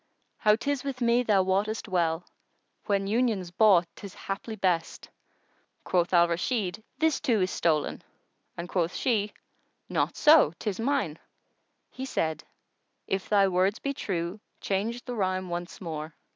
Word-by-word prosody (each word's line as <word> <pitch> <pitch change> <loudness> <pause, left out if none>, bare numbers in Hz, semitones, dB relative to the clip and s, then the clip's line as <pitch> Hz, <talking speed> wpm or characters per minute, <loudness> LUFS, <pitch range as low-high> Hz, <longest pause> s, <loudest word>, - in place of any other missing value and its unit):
How 210 -1 +5
'tis 280 +3 -2
with 275 -2 -4
me 240 0 +3
thou 205 -5 +3
wottest 200 +4 0
well 175 -3 0 0.3
* - - -46
When 200 -2 +1
union's 210 -4 0
bought 185 -2 +5
'tis 200 -2 -10
haply 200 +3 -5
best!" 180 -5 -1 0.7
Quoth 175 -1 +1
Al 175 -1 +5
Rashid, 185 +3 -1 0.2
"This 320 -1 +2
too 240 -7 +1
is 185 - +1
stolen"; 155 -3 0 0.6
and 170 +1 -5
quoth 175 -1 -1
she, 210 -5 0 0.6
"Not, - - 0
so, 300 - +6
'tis 205 -2 -3
mine." 230 - 0 0.7
He 260 - -6
said, 160 - -2 0.6
"If 195 0 -2
thy 200 -2 +5
words 190 +3 +2
be 280 +1 -3
true 180 -4 -3 0.2
change 220 +5 -2
the 250 - -4
rhyme 185 -4 -1
once 175 +1 -5
more." 160 -3 -6
195 Hz, 145 wpm, -28 LUFS, 175-230 Hz, 0.7 s, so